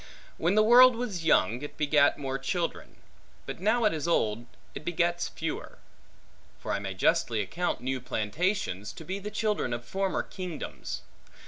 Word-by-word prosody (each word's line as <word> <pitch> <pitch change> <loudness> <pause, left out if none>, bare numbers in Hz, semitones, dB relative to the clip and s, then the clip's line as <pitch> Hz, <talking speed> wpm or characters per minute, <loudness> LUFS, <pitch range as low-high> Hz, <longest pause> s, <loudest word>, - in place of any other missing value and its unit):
When 175 +5 +2
the 215 - +6
world 245 +2 +8
was 210 -8 -4
young, 120 - +3
it 145 - -8
begat 145 -1 +4
more 135 -2 -3
children; 170 +5 -3 0.5
but - - -6
now 220 +5 +2
it 210 - +3
is 155 0 -3
old, 115 -7 +1 0.3
it - - -7
begets 175 +1 0
fewer: 160 -1 -5 0.8
for - - -5
I 100 - 0
may 95 -1 -5
justly 110 +4 +2
account 170 - -2
new 130 0 -2
plantations, 110 - -2
to 160 - -10
be 190 +4 -3
the 205 +1 -5
children 210 - -1
of 120 0 -5
former 195 +7 -1
kingdoms. 180 -5 -6
165 Hz, 160 wpm, -28 LUFS, 125-195 Hz, 0.8 s, world